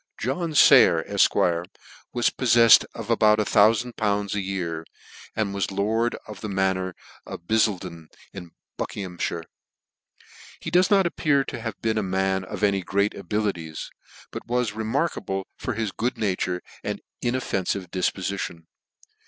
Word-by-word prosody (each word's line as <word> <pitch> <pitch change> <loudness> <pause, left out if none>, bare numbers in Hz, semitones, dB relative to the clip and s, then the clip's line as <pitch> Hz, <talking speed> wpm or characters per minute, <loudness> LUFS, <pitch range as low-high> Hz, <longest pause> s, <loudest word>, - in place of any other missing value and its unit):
John 155 +6 -2
Sayer, - - +7
Efq. 85 0 +2 0.4
was 120 -1 +1
pofiefled 115 -2 +6
of 115 0 -5
about 110 -2 +4
loool. 105 -1 +2
a 105 - -1
yea 95 -2 -3
r, 80 - -9 0.5
and 105 -3 -1
was 100 -1 -1
lord 110 +4 0
of 105 -3 -9
the 110 - -4
Manor 95 -1 0 0.3
of - - -7
Biddlefden, 90 -5 -1 0.3
in 90 -3 -9 0.3
Biickirighammire. 90 -3 -4 1.2
He - - -6
does 180 +1 +4
not 195 -2 +4
appear 145 -5 +1
to - - -7
have 110 -4 -5
been 110 -1 +1
a - - 0
man 95 0 0
of 95 - -6
any 100 -2 +2
great 100 +3 0
abilities; 95 -5 -3 0.4
but - - -7
was 120 -3 0
re 110 +1 -4
markable 110 - -1
for - - -4
his 110 -2 -2
good 120 +6 -2
nature 90 -3 -1 0.2
and - - -4 0.2
inoffenfive 100 -7 -2
dif 90 -1 +1
pofition. 95 -3 -5
100 Hz, 145 wpm, -24 LUFS, 95-115 Hz, 1.2 s, Sayer